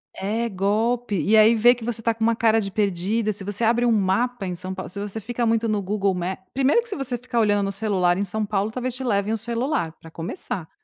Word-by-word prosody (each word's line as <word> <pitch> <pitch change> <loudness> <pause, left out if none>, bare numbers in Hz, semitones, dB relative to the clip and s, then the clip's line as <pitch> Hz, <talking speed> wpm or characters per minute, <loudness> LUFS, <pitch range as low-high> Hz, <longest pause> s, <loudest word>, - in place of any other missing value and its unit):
É, 220 +5 -1
golpe. 215 +2 0
E 205 +8 +3
aí 220 +2 +7
vê 240 +3 +6
que 245 - -10
você 230 -1 -2
está 230 0 +1
com 225 - -21
uma 230 0 +3
cara 225 -1 +3
de 195 - -3
perdida, 205 +2 0
se 195 - -7
você 205 +3 -3
abre 235 +2 +3
um 235 - +3
mapa 215 +3 +1
em 180 - -3
São 185 +2 -6
Pau 185 0 -6
se 200 +3 -7
você 205 +2 -4
fica 240 +3 -3
muito 230 0 +1
no 210 -2 0
Google 200 0 0
Ma 180 +1 -3 0.2
1º 275 - +3
que - - -12
se 405 - -3
você 265 -3 -3
ficar 245 0 -2
olhando 205 -2 +3
no 195 - -2
celular 195 -4 +1
em 200 - 0
São 210 +2 -2
Paulo, 205 0 -1
talvez 250 +2 -3
te 260 - -5
levem 210 -2 0
o - - 0
celular, 235 - -1
pra 165 - -13
começar. 170 +2 -5
215 Hz, 255 wpm, -23 LUFS, 195-235 Hz, 0.2 s, aí